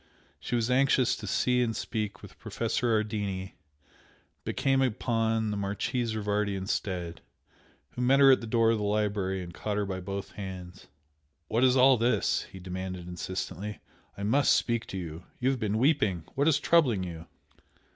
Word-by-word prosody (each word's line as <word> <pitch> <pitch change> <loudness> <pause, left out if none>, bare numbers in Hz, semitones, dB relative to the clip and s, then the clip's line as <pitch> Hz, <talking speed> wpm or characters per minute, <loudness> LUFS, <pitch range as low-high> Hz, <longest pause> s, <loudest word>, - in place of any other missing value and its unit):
She - - -3
was 120 +1 0
anxious 130 -1 +3
to - - -7
see 125 0 +2
and 115 -2 0
speak 105 -3 -4
with - - -13
Professor 120 -2 -1
Ardini, 105 -3 -2 0.9
but - - -4
came 135 0 +2
upon 115 -3 0
the 105 - -2
Marchese 110 +4 -2
Rivardi 105 -1 0
instead, 95 -3 -3 0.7
who - - -5
met 130 +3 +4
her 135 -1 +8
at 130 - +4
the 115 - -6
door 115 0 +3
of 115 - 0
the - - -2
library 100 -2 0
and 85 -1 -9
caught 105 +2 -3
her 105 - 0
by 95 -1 -4
both 100 +2 -5
hands. 95 -2 -8 0.6
"What 115 +3 +2
is 130 0 +5
all 130 0 +6
this?" 120 +2 +1
he 95 - -10
demanded, 90 -1 -6
insistently 95 +3 -5 0.4
"I 100 - -5
MUST 135 +8 +4
speak 115 -2 0
to 95 - -5
you! 85 -1 -7
You 130 +2 +2
have 130 - -3
been 105 -1 0
weeping! 110 - +2
What 140 +2 +1
is 150 -2 +4
troubling 135 - +3
you?" 85 -2 -7
105 Hz, 175 wpm, -29 LUFS, 95-125 Hz, 0.9 s, her